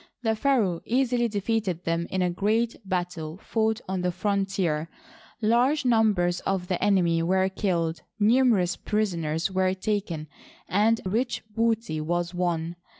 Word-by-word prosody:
The 220 -1 +1
pharaoh 215 -9 +1
easily 245 -1 +1
defeated 205 -4 -1
them 165 0 -1
in 185 -1 0
a 180 - +1
great 220 +6 0
battle 175 -4 -3
fought 220 +2 -1
on 190 -1 -2
the 180 0 0
frontier; 190 -4 -1 0.5
large 250 +7 +3
numbers 210 -7 +3
of 190 -2 -2
the 180 -1 -1
enemy 175 -5 +3
were 190 +3 +2
killed, 170 -4 -1 0.2
numerous 215 -4 +3
prisoners 170 -6 -1
were 185 0 +1
taken, 190 -6 -2 0.4
and 220 +4 +2
rich 240 +5 -1
booty 225 -8 0
was 175 +2 -1
won. 175 -1 -1
190 Hz, 135 wpm, -26 LUFS, 175-220 Hz, 0.5 s, large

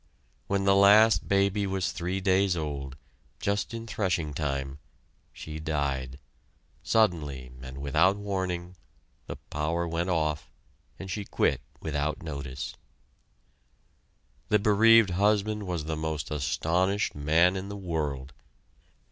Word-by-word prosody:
When 100 0 0
the 100 0 +4
last 105 +3 +6
baby 100 +1 +2
was 95 -1 -1
three 90 +2 -3
days 95 -1 +2
old, 70 -3 -4 0.4
just 100 +1 -1
in 115 0 -6
threshing 90 -8 -1
time, 70 -2 -3 0.5
she 80 0 -8
died. 70 -4 -2 0.6
Suddenly, 75 - 0
and 65 0 -8
without 80 +8 +2
warning, 95 -3 -3 0.5
the - - -5
power 80 +3 -3
went 85 +2 -2
off, 75 -3 -1 0.5
and 95 -1 -7
she 105 +3 -3
quit 70 -8 0 0.2
without 75 0 -2
notice. 70 -2 -5 1.8
The 105 - +5
bereaved 110 0 +5
husband 105 +2 +1
was 85 -4 -2
the 80 0 -2
most 80 -1 -3
astonished 80 +7 0
man 80 +5 +3
in 95 +1 -5
the 100 - -6
world. 75 -8 -3
85 Hz, 120 wpm, -28 LUFS, 75-100 Hz, 1.8 s, last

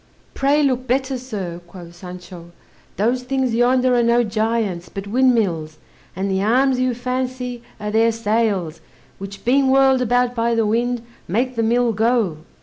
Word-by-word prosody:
"Pray 285 +2 +2
look 255 -2 0
better, 265 +2 0
sir," 200 -9 -6
quoth 170 -1 -12
Sancho; 180 -1 -10 0.5
"those 240 +5 +1
things 260 -1 -1
yonder 250 +2 +3
are 240 - +3
no 235 +1 +3
giants, 215 -5 -1
but 195 -1 -7
windmills, 205 -10 +1 0.4
and 190 +2 -2
the 190 0 0
arms 255 +5 +2
you 255 -1 0
fancy, 250 0 -3 0.2
are 210 0 -4
their 225 +1 +3
sails, 210 -7 -1 0.4
which 195 0 -9
being 265 +2 +3
whirled 265 -1 +4
about 245 0 +1
by 235 0 0
the 225 -1 +2
wind, 235 +2 0 0.2
make 250 +8 -1
the 230 - 0
mill 235 +1 +2
go." 220 -6 +1
235 Hz, 155 wpm, -20 LUFS, 200-255 Hz, 0.5 s, whirled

